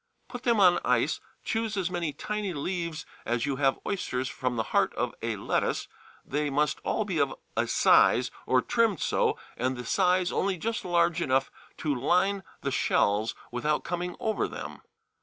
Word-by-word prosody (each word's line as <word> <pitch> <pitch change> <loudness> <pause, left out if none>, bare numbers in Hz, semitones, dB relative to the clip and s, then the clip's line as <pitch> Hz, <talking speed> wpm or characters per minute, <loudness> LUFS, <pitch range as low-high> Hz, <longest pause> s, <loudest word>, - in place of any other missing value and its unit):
Put 245 - -7
them 235 -4 +2
on 180 -3 +6
ice, - - +2 0.2
choose 225 -2 -1
as 185 -2 -1
many 170 -4 -1
tiny 210 +4 -3
leaves 170 +1 -3 0.2
as 115 0 0
you 140 -2 -1
have 135 -1 +2
oysters 130 -10 -2
from 125 -2 -2
the 110 - 0
heart - - +3
of - - -1
a - - -1
lettuce; - - -1 0.4
they 145 +1 -1
must 145 +1 +1
all 215 - -1
be 185 -6 -1
of 140 -2 +1 0.2
a - - +1
size, 125 +1 +4 0.2
or 130 -1 +3
trimmed 225 -8 +2
so, - - +1 0.2
and 130 +1 -1
the 125 - -6
size 185 -1 +2
only 195 -1 0
just 225 +6 -2
large 170 -1 +2
enough 135 -3 +1 0.3
to 150 -2 0
line 180 +9 +2 0.2
the - - -2
shells 105 +2 +2 0.2
without 150 +5 0
coming 175 0 -3
over 220 -1 0
them. - - -8
170 Hz, 175 wpm, -28 LUFS, 135-195 Hz, 0.4 s, on